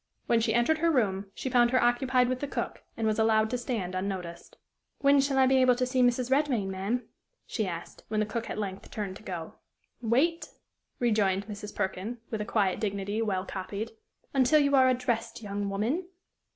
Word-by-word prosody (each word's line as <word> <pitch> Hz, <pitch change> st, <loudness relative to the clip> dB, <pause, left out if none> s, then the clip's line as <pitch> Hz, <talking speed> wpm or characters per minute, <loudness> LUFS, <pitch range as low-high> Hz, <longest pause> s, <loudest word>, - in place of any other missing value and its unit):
When 235 Hz, -, +3 dB
she -, -, +1 dB
entered 275 Hz, +7 st, +3 dB
her 335 Hz, +1 st, +3 dB
room, 205 Hz, -9 st, +1 dB
she -, -, -4 dB
found 240 Hz, -2 st, +4 dB
her 255 Hz, +1 st, +3 dB
occupied 250 Hz, +1 st, +3 dB
with 255 Hz, 0 st, -1 dB
the 285 Hz, -, -3 dB
cook, -, -, -4 dB, 0.2 s
and 225 Hz, -, -1 dB
was 215 Hz, 0 st, +1 dB
allowed 220 Hz, 0 st, +3 dB
to 250 Hz, -, 0 dB
stand 220 Hz, -7 st, -3 dB
unnoticed. 185 Hz, -3 st, -5 dB, 0.4 s
"When 280 Hz, 0 st, +5 dB
shall 275 Hz, 0 st, 0 dB
I 265 Hz, -, +6 dB
be 265 Hz, 0 st, +4 dB
able 255 Hz, -1 st, +5 dB
to 255 Hz, +1 st, 0 dB
see 255 Hz, 0 st, +1 dB
Mrs. 245 Hz, +1 st, +2 dB
Redmain, 265 Hz, -9 st, +2 dB
ma'am?" 200 Hz, +6 st, -2 dB, 0.4 s
she 215 Hz, -4 st, -2 dB
asked, 170 Hz, -1 st, -7 dB
when 215 Hz, 0 st, -1 dB
the 215 Hz, -, +2 dB
cook 225 Hz, +2 st, -4 dB
at -, -, -4 dB
length 195 Hz, -2 st, -5 dB
turned 200 Hz, -3 st, -4 dB
to -, -, -17 dB
go. 175 Hz, -6 st, -6 dB, 0.4 s
"Wait," 270 Hz, +9 st, +1 dB, 0.5 s
rejoined 205 Hz, -5 st, +1 dB
Mrs. 210 Hz, 0 st, -8 dB
Perkin, 190 Hz, +5 st, -2 dB
with 220 Hz, -2 st, -2 dB
a -, -, -2 dB
quiet 200 Hz, -4 st, +1 dB
dignity, 200 Hz, +1 st, -2 dB
well 195 Hz, -4 st, -1 dB
copied, 200 Hz, +4 st, -5 dB, 0.4 s
"until 270 Hz, +3 st, +5 dB
you 285 Hz, -1 st, +3 dB
are 260 Hz, -1 st, +6 dB
addressed, 245 Hz, -3 st, -1 dB
young 200 Hz, 0 st, -3 dB
woman." 235 Hz, -, -1 dB
225 Hz, 195 wpm, -29 LUFS, 200-255 Hz, 0.5 s, I